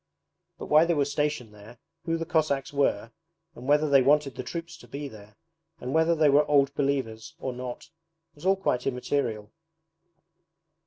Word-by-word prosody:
But - - -7
why 155 +2 +5
they 170 0 +1
were 145 -2 +2
stationed 145 -5 -2
there, 105 +3 -14 0.3
who 165 0 0
the 165 - -4
Cossacks 155 -4 0
were, 115 -6 0 0.4
and 130 -4 -10
whether 150 +1 +4
they 140 -2 +5
wanted 140 0 +3
the - - -5
troops 165 +6 -6
to 120 - -16
be 140 +4 -6
there, 105 -4 -14 0.4
and 125 +2 -5
whether 160 +1 +3
they 155 -1 +4
were 145 +1 +5
Old 140 -1 +3
Believers 130 -6 -2
or 130 - -4
not 125 +5 -7 0.4
was 145 - -17
all 190 +1 +4
quite 130 -10 -1
immaterial. 125 -5 -2
140 Hz, 170 wpm, -27 LUFS, 125-150 Hz, 0.4 s, why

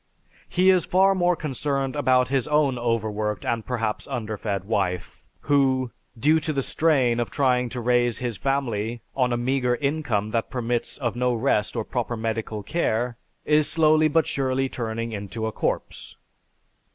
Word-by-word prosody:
He 185 +1 +4
is 180 -3 +3
far 190 +2 +4
more 180 -1 +2
concerned 140 -3 -2
about 130 -3 +3
his 135 -2 0
own 150 -4 +2
overworked 110 -3 -1
and 115 -1 -1
perhaps 115 -3 -2
underfed 105 -4 -3
wife 90 -4 -2 0.2
who, 130 -3 +2 0.3
due 155 +7 +4
to 155 0 -2
the 135 -2 -1
strain 130 -8 +2
of 120 -4 -1
trying 125 -1 +1
to 125 - -5
raise 120 -1 +2
his 120 -3 -3
family 120 -4 -2
on 125 -2 +1
a 120 - +1
meager 125 0 +1
income 125 -7 -1
that 115 0 -1
permits 120 -1 -2
of 120 -4 -2
no 125 0 +1
rest 110 -3 0
or - - -1
proper 120 -1 -3
medical 110 -1 -3
care, 120 - -1 0.3
is 150 0 +3
slowly 155 -1 +4
but 160 +1 +2
surely 135 -1 0
turning 115 -2 -4
into 105 +2 -4
a 110 - -1
corpse. - - -3
125 Hz, 160 wpm, -24 LUFS, 115-140 Hz, 0.3 s, He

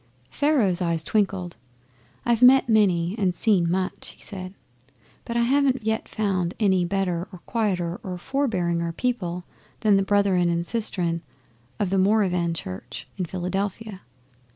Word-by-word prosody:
Pharaoh's 245 - +2
eyes 170 -2 0
twinkled. 190 - -1 0.7
'I've 235 -1 +2
met 260 +1 +7
many 190 -6 +3
and 185 -3 +1
seen 185 -6 +2
much,' 185 +1 -3
he - - -16
said; 185 -2 -8 0.7
'but 235 - -3
I - - +3
haven't 265 -1 +2
yet 220 0 -1
found 190 -5 -1
any 190 -4 +3
better 180 -1 -1
or 180 -3 -11
quieter 185 -6 -1
or 180 -1 -5
forbearinger 175 -9 -1
people 180 -9 -2 0.4
than 210 -3 +4
the - - +3
Brethren 195 -3 +2
and 170 0 -1
Sistern 175 -6 +1 0.6
of 200 -3 0
the 195 - +2
Moravian 185 -4 +2
Church 95 - -7
in 185 - -1
Philadelphia. 195 +3 -4
190 Hz, 140 wpm, -24 LUFS, 175-220 Hz, 0.7 s, met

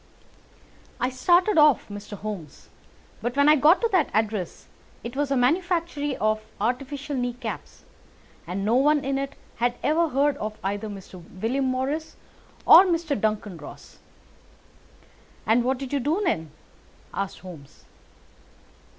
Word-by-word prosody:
"I 250 - 0
started 350 +7 +3
off, 300 -4 +5
Mr. 205 0 -8
Holmes, 195 -9 -8 0.5
but 240 +4 -3
when 285 +1 +5
I 305 - +7
got 310 +6 +5
to 465 - +1
that 365 -6 +2
address 215 -4 -2 0.4
it 235 +2 -7
was 290 0 0
a 275 - +1
manufactory 315 0 0
of 215 0 +1 0.2
artificial 275 +6 -2
knee 245 -1 -1
caps, 245 -3 -7 0.6
and 190 +3 -3
no 220 - +2
one 290 +1 +3
in 270 0 0
it 275 0 -4 0.2
had 240 +1 +1
ever 315 +5 +2
heard 280 +1 +1
of 215 -2 -5
either 205 +2 -3
Mr. 190 -3 -10 0.2
William 260 +6 0
Morris 265 +5 -2 0.5
or 345 - +10
Mr. 335 -4 0
Duncan 210 -3 -2
Ross." 150 - -12 1.5
"And 230 +2 +3
what 260 +2 0
did 270 +1 -7
you 285 - +2
do 300 +9 0
then?" 160 - -1 0.6
asked 195 -1 -3
Holmes. 165 -7 -13
255 Hz, 140 wpm, -25 LUFS, 215-295 Hz, 1.5 s, or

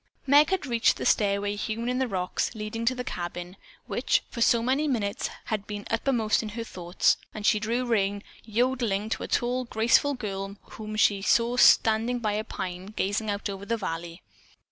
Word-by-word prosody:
Meg 290 +3 +6
had 380 -5 0
reached 235 -3 +2
the - - -4
stairway 205 0 +2
hewn 220 +3 -3
in 250 +1 0
the 260 - +1
rocks, 185 +2 -2
leading 220 +2 -4
to 255 +2 +2
the 250 - -4
cabin, 175 -3 -5 0.3
which, - - +1
for 235 - -5
so 230 0 +4
many 270 +5 +1
minutes 215 -7 -1 0.2
had 215 -2 -3
been 205 -1 -6
uppermost 225 -2 +1
in 220 - -5
her 230 +2 -5
thoughts, 180 -4 +1 0.2
and 210 -1 -5
she 215 - +4
drew 235 +4 -1
rein, 205 -3 0 0.2
yodeling 225 -2 0
to - - -2
a - - -4
tall, 250 +1 0
graceful 240 +6 +2
girl 195 -4 -5 0.2
whom 215 -1 -7
she 205 -2 +3
saw 235 +4 +2
standing 230 0 +5
by 215 -3 -1
a 215 +1 -1
pine 185 -4 -6
gazing 210 +1 -2
out 200 0 -2
over 195 -1 -6
the 230 +3 -1
valley. 170 -3 -5
220 Hz, 190 wpm, -27 LUFS, 200-240 Hz, 0.3 s, Meg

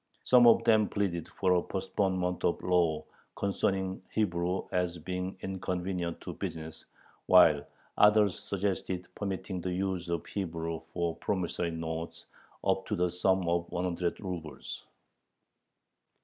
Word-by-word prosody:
Some 125 -1 +7
of 115 - +6
them 110 -2 +4
pleaded 95 -5 -1
for 95 -2 +1
a 90 - +3
postponement 95 -2 -1
of 85 - +2
the - - -11
law 85 -4 +2 0.3
concerning 95 -1 -1
Hebrew 90 -3 0
as 90 -2 0
being 90 +3 -4
inconvenient 90 -2 -3
to - - -6
business, 80 0 -6 0.4
while 80 -6 +6 0.3
others 105 -3 +5
suggested 95 -2 -2
permitting 95 -2 -4
the 90 - -2
use 90 -1 -2
of 85 -2 -2
Hebrew 85 -4 -3
for 85 +1 -3
promissory 90 -3 -1
notes 80 0 -5 0.4
up 95 0 +1
to - - 0
the 90 0 +1
sum 95 0 +2
of 85 0 0
one 90 - -1
hundred 90 -1 -1
rubels. 85 -6 -6
90 Hz, 135 wpm, -30 LUFS, 85-95 Hz, 0.4 s, Some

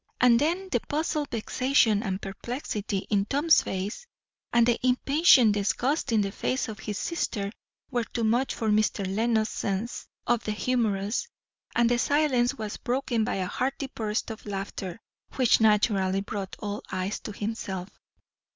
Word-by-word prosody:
And 240 -1 +6
then, 350 +6 0
the 245 - +2
puzzled 300 +2 -2
vexation 230 -1 +2
and 195 -4 -2
perplexity 210 -1 -4
in 200 -1 +3
Tom's 290 +8 +4
face, 200 - -4 0.4
and 235 -1 +5
the 240 -1 +2
impatient 255 -1 +5
disgust 245 +8 0
in 220 -2 +4
the 195 -1 -1
face 255 +5 -1
of 220 -1 -7
his 210 -2 -4
sister, 205 -12 -2 0.4
were 240 -2 0
too 235 - -3
much 240 +4 +1
for 220 - -1
Mr. 210 -1 +2
Lenox's 220 +3 +1
sense 205 +4 -3 0.2
of 240 -2 +1
the 215 - -2
humorous; 215 - 0 0.5
and 240 0 +4
the 240 0 +2
silence 275 -4 +2
was 215 -2 -5
broken 245 -2 0
by - - -1
a 190 -1 -1
hearty 265 +6 -2
burst 215 +1 -2
of 220 -1 -9
laughter, 195 -1 -5 0.4
which 250 -4 +4
naturally 200 -3 +3
brought 200 -1 -5
all 205 0 -4
eyes 185 +2 -2
to - - -7
himself. 205 -3 -5
225 Hz, 155 wpm, -27 LUFS, 205-255 Hz, 0.5 s, And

